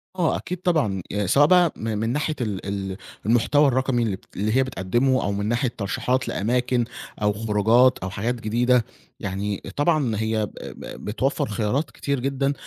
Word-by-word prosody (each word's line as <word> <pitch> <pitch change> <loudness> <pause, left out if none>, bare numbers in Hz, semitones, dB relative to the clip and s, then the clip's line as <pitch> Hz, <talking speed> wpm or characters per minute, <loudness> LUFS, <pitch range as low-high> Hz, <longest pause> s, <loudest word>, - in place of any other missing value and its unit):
آه، 170 -4 +1
أكيد 180 - -5
طبعًا. 110 - +1
يعني 105 -2 -1
سواء 145 +8 +5
بقى 180 -2 +5
من 110 -1 -3
من 115 +2 -1
ناحية 150 +4 -1
ال 100 -5 -3
ال 95 -1 -3 0.3
المحتوى 130 +6 +4
الرقمي 130 -2 +1
اللي 105 -4 0
بت - - -19
اللي 110 +4 0
هي 135 - +5
بتقدمه 130 +3 +1
أو 100 - 0
من 100 +1 -2
ناحية 120 +2 0
ترشيحات 125 +6 -1
لأماكن 125 +2 0 0.4
أو 105 0 +2
خروجات 115 +4 +3
أو 95 - -4
حاجات 110 +6 -2
جديدة، 120 +2 +2 0.3
يعني 100 0 -3
طبعًا 145 -7 +2
هي 110 0 0
ب - - -11
ب - - -9
بتوفّر 125 +6 0
خيارات 115 +8 -1
كتير 140 -2 -2
جدًا، 135 +1 0
120 Hz, 175 wpm, -24 LUFS, 105-135 Hz, 0.4 s, سواء